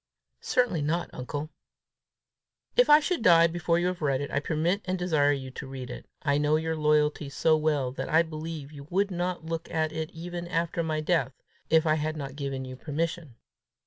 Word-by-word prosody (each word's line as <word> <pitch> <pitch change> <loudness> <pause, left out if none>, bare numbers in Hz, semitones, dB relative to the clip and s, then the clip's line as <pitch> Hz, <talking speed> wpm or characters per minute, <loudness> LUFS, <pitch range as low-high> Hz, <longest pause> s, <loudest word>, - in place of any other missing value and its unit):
"Certainly 230 -11 +1
not, 165 +4 -1
uncle." 145 +5 -5 1.2
"If - - +5
I 295 0 +9
should 340 -1 -1
die 170 -4 +7
before 170 0 +1
you 175 - +1
have 180 -1 -2
read 140 -3 +1
it, 140 - -4
I - - +1
permit 165 +6 0
and 185 0 -1
desire 155 -5 +2
you 135 -2 -3
to 130 - -8
read 130 -2 -7
it. - - -9 0.2
I 140 -1 +2
know 150 +1 +3
your 160 +1 0
loyalty 150 -1 +2
so 160 +3 +3
well, 150 -4 +1
that 130 - -5
I 160 +2 +5
believe 155 -2 -6
you 140 -2 -11
would 195 +2 +1
not 175 -1 -2
look 165 0 -4
at 155 -1 0
it 160 0 -4
even 175 +1 -6
after 170 0 -1
my 155 -1 -1
death, 155 -5 +1 0.4
if 160 0 +4
I 155 - +4
had 155 0 -1
not 140 -2 -6
given 135 -2 -4
you 130 0 -7
permission. 155 0 -3
155 Hz, 200 wpm, -28 LUFS, 145-170 Hz, 1.2 s, I